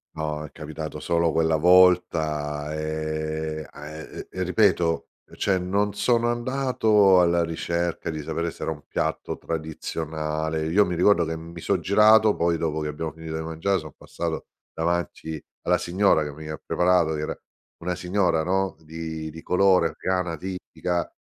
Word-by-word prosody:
No, 75 -1 -3
è 75 - -12
capitato 80 0 -6
solo 85 -1 +1
quella 80 0 +2
volta, 80 -4 +3
ehm, 80 0 -3
a 75 - -11
e - - -7
ehm, - - -9
e 95 - -2
ripeto 90 -3 +2 0.2
e - - -14
cioè 95 -2 +1
non 100 +3 0
sono 120 +3 +2
andato 120 -6 +3
alla 85 -1 +3
ricerca 85 +1 -2
di 80 -2 -4
sapere 85 +2 -2
se - - -8
era - - -1
un 75 -2 -7
piatto - - -2
tradizionale. 80 0 -3
Io 100 +6 +4
mi 90 - -2
ricordo 90 0 +4
che 80 +1 -3
mi 85 +1 -9
so' 100 +4 +1
girato, 105 +4 +5
poi 85 0 +1
dopo 80 -1 -1
che 75 - -2
abbiamo 80 +2 -4
finito 80 0 -7
di 80 - -2
mangiare 80 +5 0
so' - - -9
passato 85 -2 -4 0.3
davanti 80 -1 -2 0.2
alla 90 +1 +3
signora, 90 -2 +2
che 75 - -4
mi 80 +1 -9
ha 75 0 -5
preparato, 90 -3 +3
che 75 - -3
era 75 - -4 0.4
una 90 +1 -1
signora 90 -2 +1
no 95 +2 0
di 80 0 -6
di 80 +1 -10
colore, 90 -2 +4
afgana, 90 -2 -2
tipica, 90 0 -3
85 Hz, 165 wpm, -25 LUFS, 80-90 Hz, 0.4 s, girato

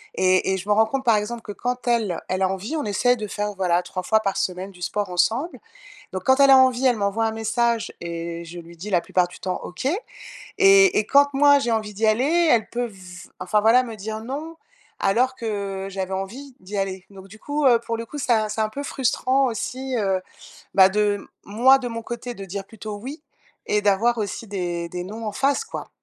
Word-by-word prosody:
et 185 0 +2
et 190 - +1
je 190 +2 -8
me 210 - +4
rends 220 +1 +4
compte, 270 +3 -3
par 230 -3 +5
exemple, 225 +3 -4
que 210 - -7
quand 245 +3 -4
elle, 220 -8 +1
elle 185 +1 -2
a 190 - +3
envie, 195 +10 -4
on 305 - -1
essaie 215 +5 +2
de 215 -3 -5
faire, 205 +1 -3
voilà, 180 -2 +1
3 185 - -5
fois 220 +4 +2
par 195 -3 -2
semaine 185 +2 -2
du 180 - -17
sport 200 +1 -2
ensemble, 225 - 0 0.5
donc 185 0 -5
quand 260 +1 +4
elle 275 -1 +6
a 265 - +9
envie, 260 0 +3
elle 245 -2 +4
m'envoie 200 +3 0
un 220 - 0
message 230 +1 -1
et 170 0 -5
je 170 +1 -9
lui 170 +1 -14
dis 195 +6 -7
la 180 -3 +3
plupart 180 +1 +1
du 175 - -14
temps: 185 -1 -2
«OK» 180 +9 -6 0.7
et 390 - +6
et 215 - +2
quand, 285 +3 +5
moi, 285 +1 +6
j'ai 240 -4 -1
envie 215 -1 -1
d'y 220 +3 0
aller, 290 +10 +3
elle 225 -3 +2
peut 245 0 -2
v 185 -4 -12
enfin, 195 +3 +1
voilà, 230 +4 +5
me 230 -3 -7
dire: 215 +2 -5
«non» 305 +6 -6 0.4
alors 250 +6 +2
que 200 -4 -4
j'avais 190 -1 -4
envie 245 +9 -6
d'y 200 +2 -6
aller, 190 -1 -3
donc 195 0 -13
du 215 +3 -14
coup, 290 +4 -1
heu, 240 -3 +5
pour 230 -1 -3
le 230 - -5
coup, 295 - -9
ça, 225 -6 +1
c'est 215 +1 -4
un 215 - -1
peu 280 +6 -5
frustrant 265 0 +1
aussi, 255 +2 -3
heu, 195 -2 0 0.5
bah, 190 -1 +7
de 205 0 0 0.2
moi, 245 +6 +5
de 250 - -4
mon 230 -1 -5
côté, 240 +1 -6
de 200 - -9
dire 195 +1 -6
plutôt: 215 0 -8
«oui» 275 +8 -8 0.5
et 210 - +1
d'avoir 210 +4 +2
aussi 215 +1 -4
des 175 -3 -3
des 180 +1 -5
non 220 +4 -7
en - - -2
face, 275 - +1
quoi. - - -7
215 Hz, 230 wpm, -23 LUFS, 190-245 Hz, 0.7 s, a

